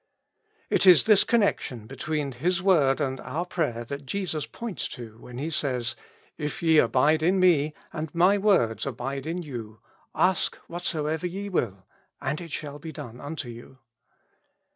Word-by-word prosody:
It - - +4
is 180 -3 +9
this 215 -3 +6
connection 200 - +1
between 140 +3 -3
His 170 +9 0
word 160 -8 +3
and 135 -2 -1
our 160 +7 -3
prayer 135 -10 -2
that 140 +2 -7
Jesus 175 -4 -2
points 230 -6 -5
to 115 -4 -10
when 125 0 -10
He 150 +5 -3
says, 125 -6 0 0.2
" - - -31
If 150 +2 -4
ye 160 -2 +6
abide 145 +6 +3
in 185 +4 +3
me, 155 -5 +4 0.2
and 155 0 -4
my 185 +4 +5
words 180 - +2
abide 135 +2 -4
in 175 +2 -3
you, 115 -7 -7 0.4
ask 185 -1 +2
whatso 170 -3 -3
ever 160 +3 -1
ye 200 +3 -5
will, 100 - -2 0.3
and 140 +4 -2
it 170 - -8
shall 145 0 -5
be 160 +1 -7
done 120 -4 -9
unto 145 -2 -5
you." 120 +3 -11
150 Hz, 165 wpm, -26 LUFS, 130-175 Hz, 0.4 s, is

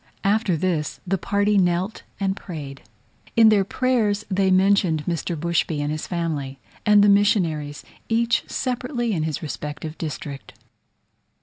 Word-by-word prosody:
After 200 -3 +2
this 150 -4 -1
the 190 +1 -1
party 205 0 +2
knelt 180 +3 0 0.2
and 195 -1 0
prayed: 145 -8 -8 0.5
in 225 -1 +7
their 205 -2 +4
prayers 220 -2 0
they 190 0 +2
mentioned 185 -5 +3
Mr. 170 -1 -2
Bushby 170 -2 0
and 145 0 -1
his 155 0 -4
family, 155 -6 -3 0.3
and 210 -1 +6
the - - +5
missionaries, 170 -8 +2 0.3
each 235 +1 +2
separately 250 -2 -2
in 165 - -1
his 155 +2 -3
respective 150 +1 -6
district. 145 -3 -6
185 Hz, 135 wpm, -23 LUFS, 155-205 Hz, 0.5 s, in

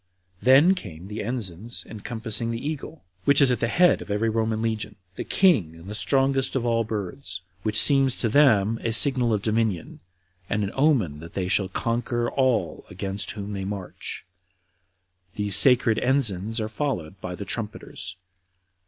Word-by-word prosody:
Then 140 +9 +5
came 90 - -9
the 105 +1 -5
ensigns 110 -2 -3
encompassing 115 +1 -2
the 115 +4 -4
eagle, 155 +1 -7 0.2
which 140 0 +5
is 135 -3 +6
at 125 - -1
the 115 - 0
head 175 +9 +3
of - - -10
every 105 +3 0
Roman 110 0 -1
legion, 110 -1 -3 0.2
the - - -5
king, 110 - +2
and 85 +1 -14
the 100 - -7
strongest 135 +4 0
of 125 -3 -1
all 115 -1 +1
birds, 100 -3 -5 0.2
which 105 +2 +1
seems 135 -3 +5
to 120 - 0
them 115 -4 +3
a 115 - -1
signal 125 0 +6
of 105 -2 -1
dominion, 110 -6 -2 0.5
and 105 - -1
an 100 - -3
omen 130 - +1
that 85 +1 -12
they 95 -2 -2
shall 95 0 +1
conquer 120 +3 -2
all 130 -4 -1
against 95 +2 -4
whom 100 0 -6
they 95 -1 -5
march; 95 -2 -6 1.1
these 105 -2 +4
sacred 120 -4 +5
ensigns 115 -5 +1
are 110 - -2
followed 105 - -4
by 90 - -6
the 100 - -8
trumpeters. 105 -5 -6
110 Hz, 165 wpm, -24 LUFS, 100-130 Hz, 1.1 s, is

